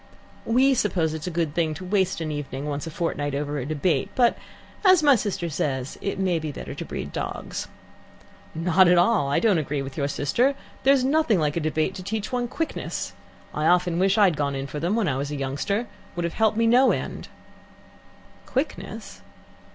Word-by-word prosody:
"We 260 +4 +4
suppose 175 -9 +1
it 160 - -4
is - - -6
a - - 0
good 165 -3 -1
thing 160 -2 0
to 185 - -8
waste 190 -2 +1
an 155 -1 -2
evening 145 -2 -5
once 145 +1 -3
a - - -3
fortnight 145 -3 -2
over 145 0 -2
a 130 - -4
debate, 155 -1 0
but, 240 -2 +4 0.5
as 370 -5 +6
my 290 -1 +7
sister 200 -6 -1
says, 135 -4 -3
it 200 - -2
may 185 -3 +1
be 155 -1 -4
better - - -7
to - - -6
breed - - -6
dogs." - - -4 0.9
"Not 180 +3 +4
at 175 0 +5
all. 175 -5 +3
I 140 - +2
don't 210 -7 +3
agree 145 -2 -2
with 135 0 -8
your 140 -2 0
sister. 235 - +1 0.3
There's 270 -1 +4
nothing 275 -5 +3
like 150 -2 0
a - - +1
debate 155 +3 0
to 190 - -7
teach 210 +2 -3
one 245 -1 -1
quickness. 325 +6 -4 0.4
I 150 +1 0
often 175 -1 +3
wish 195 +2 +3
I 210 - +6
had 180 -6 +3
gone 140 -1 -1
in 135 0 -3
for 145 +2 -5
them 175 +7 0
when 225 -5 +1
I 130 -4 0
was 140 +1 -3
a 150 - -4
youngster. 140 - -1
It 240 - -9 0.3
would 175 - -2
have 170 - -3
helped 220 -1 +2
me 230 - +3
no 250 +3 +5
end." - - -4 1.2
"Quickness - - -4
175 Hz, 210 wpm, -25 LUFS, 145-215 Hz, 1.2 s, my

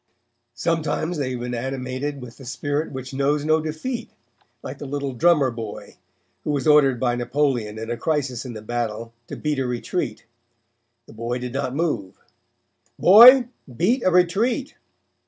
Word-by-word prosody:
Sometimes 165 +3 -1
they 135 -3 -1
have 125 -2 -4
been 125 0 -4
animated 130 +3 -4
with 115 -2 -11
the 135 - -12
spirit 145 +4 -3
which 130 -1 -7
knows 145 +2 0
no 155 0 +3
defeat, 225 +11 -4 0.5
like - - -7
the 145 - -7
little 140 -1 -3
drummer 145 -1 +3
boy, 115 -3 -8 0.5
who - - -4
was 140 -3 -1
ordered 145 -5 +5
by 120 -1 +1
Napoleon 120 -4 -1
in 110 +1 -5
a 120 - -2
crisis 135 -5 -1
in 125 -3 -7
the 110 -1 -9
battle 115 0 -4
to - - -7
beat 150 -2 -2
a 130 - -1
retreat. 125 0 -3 0.8
The - - -15
boy 115 +2 -3
did 125 -1 -6
not 135 -1 -2
move. 140 - -2 0.8
'Boy, 240 +6 +8 0.3
beat 235 +9 +2
a - - +4
retreat.' 215 - +1
135 Hz, 160 wpm, -23 LUFS, 120-155 Hz, 0.8 s, Boy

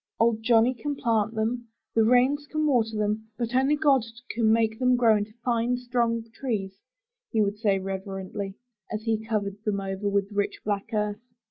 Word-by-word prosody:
''Old 230 -1 +3
Johnny 230 +1 +4
can 285 +4 -4
plant 225 -3 0
them; 230 +2 -1 0.3
the 225 - +4
rains 255 +5 +3
can 310 0 -1
water 225 -6 +2
them; 210 +1 -1
but 235 0 -2
only 265 +3 +3
God 290 -3 +4 0.3
can 225 -1 +2
make 220 0 +2
them 255 -1 +4
grow 230 -3 +5
into 210 +1 -4
fine, 240 0 +1
strong 240 -2 0
trees," 210 -7 -3 0.5
he 225 - 0
would 205 +1 -2
say 205 -3 +2
reverently, 195 +1 -5 0.4
as 215 0 -3
he 220 -1 0
covered 205 -2 -2
them 210 -2 0
over 195 +1 -2
with 200 0 0
rich 205 0 -1
black 205 +1 -1
earth. 210 -1 -1
220 Hz, 175 wpm, -26 LUFS, 205-245 Hz, 0.5 s, grow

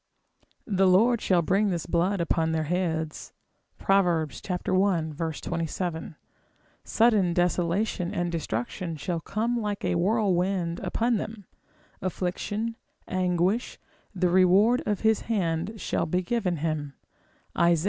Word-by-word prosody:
The 195 -3 +2
Lord 220 +6 +4
shall 175 -3 +2
bring 195 +5 +2
this 175 -3 -2
blood 175 +3 +1
upon 165 -1 +1
their 160 -1 0
heads. 160 -2 -2 0.4
Prov. 195 -1 +3
i. 170 0 0
27, 165 +1 -4 0.7
sudden 215 -6 +3
desolation 180 +1 0
and 175 0 -1
destruction 165 - -3
shall 170 +3 -2
come 220 +9 -1
like 210 -3 -3
a - - +1
whirlwind 180 -2 +1
upon 225 +5 0
them: 215 -1 -6 0.6
affliction, 205 +5 -3 0.3
anguish, 185 +4 0 0.4
the 180 -1 +2
reward 190 +7 +4
of 210 -2 0
his 220 -1 +3
hand 185 0 -1
shall 170 - -1
be 180 +3 0
given 185 -4 -1
him, 150 -3 -3 0.6
Isa. 170 -1 +4
180 Hz, 115 wpm, -27 LUFS, 170-205 Hz, 0.7 s, Lord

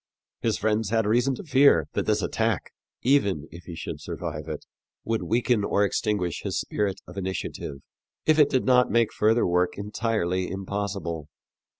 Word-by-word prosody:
His 115 -2 +1
friends 110 0 0
had 115 0 +2
reason 120 +5 +2
to - - -8
fear 140 -3 +5
that - - -1
this - - +2
attack, - - -1 0.3
even 100 - +2
if 85 +2 -11
he 85 - -7
should - - -6
survive 75 +1 -5
it, 75 -2 -5 0.4
would 115 -1 -1
weaken 120 -1 +1
or 100 0 +2
extinguish 100 -5 -1
his - - -2
spirit 100 -2 -1
of 90 - -11
initiative, 95 -7 -4 0.4
if 155 0 +4
it 145 -1 +6
did 130 - +1
not 125 -1 +5
make 115 -2 +2
further 110 +2 +3
work 90 0 +1
entirely 100 -3 -1
impossible. 95 -5 -3
105 Hz, 165 wpm, -26 LUFS, 90-115 Hz, 0.4 s, it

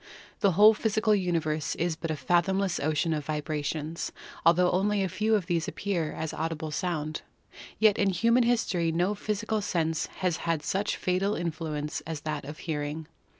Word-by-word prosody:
The 200 -3 +3
whole 210 +5 +8
physical 215 0 +1
universe 165 -6 0
is 170 -1 -1
but 165 +1 -5
a 155 - 0
fathomless 175 +6 +1
ocean 155 +2 +1
of 150 -2 -3
vibrations, 155 +1 -3 0.3
altho 175 +2 +5
only 200 +2 +1
a - - +1
few 210 +5 +1
of 200 -5 0
these 170 -3 0
appear 175 -6 -2
as 160 -1 -4
audible 160 -1 -3
sound. 155 -3 -2 0.6
Yet 215 -2 +4
in 200 - +3
human 230 +7 +3
his 235 -1 +2
tory 170 -3 0
no 175 +5 +1
physical 215 +1 -2
sense 165 -5 0
has 180 -3 -2
had 165 -3 -1
such 195 +7 -1
fateful 190 +3 0
influence 155 -3 -3
as 160 -2 -4
that 150 -2 -4
of 150 +2 -7
hearing. 150 -1 -3
170 Hz, 170 wpm, -28 LUFS, 155-200 Hz, 0.6 s, whole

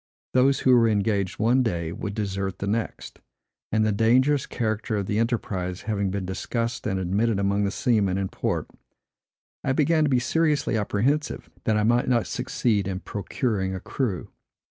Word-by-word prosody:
Those 135 +2 +4
who 130 -1 +5
were 115 -2 +5
engaged 100 -2 0
one 120 +4 +3
day 85 -8 -1
would 100 +1 -5
desert 100 -3 -2
the - - -4
next; 110 +3 -3 0.5
and 110 0 +2
the 110 - +2
dangerous 125 +7 +3
character 110 -2 -2
of 100 - -1
the 105 +3 0
enterprise 95 -6 -2
having 100 -2 -1
been 95 0 -3
discussed 115 +6 -3
and 95 -3 -1
admitted 100 +4 +1
among 100 +1 +1
the - - +1
seamen 100 -4 +1
in 95 -1 -1
port, - - -2 1.0
I 135 - +1
began 155 +3 +3
to 150 - +2
be 130 - +3
seriously 150 0 +1
apprehensive, 110 +8 -1
that 110 -1 +2
I 105 - +2
might 120 +3 +2
not 120 -3 +2
succeed 120 -5 0
in 95 -1 -3
procuring 100 -2 -2
a - - -4
crew. 105 - -3
110 Hz, 170 wpm, -25 LUFS, 100-125 Hz, 1.0 s, who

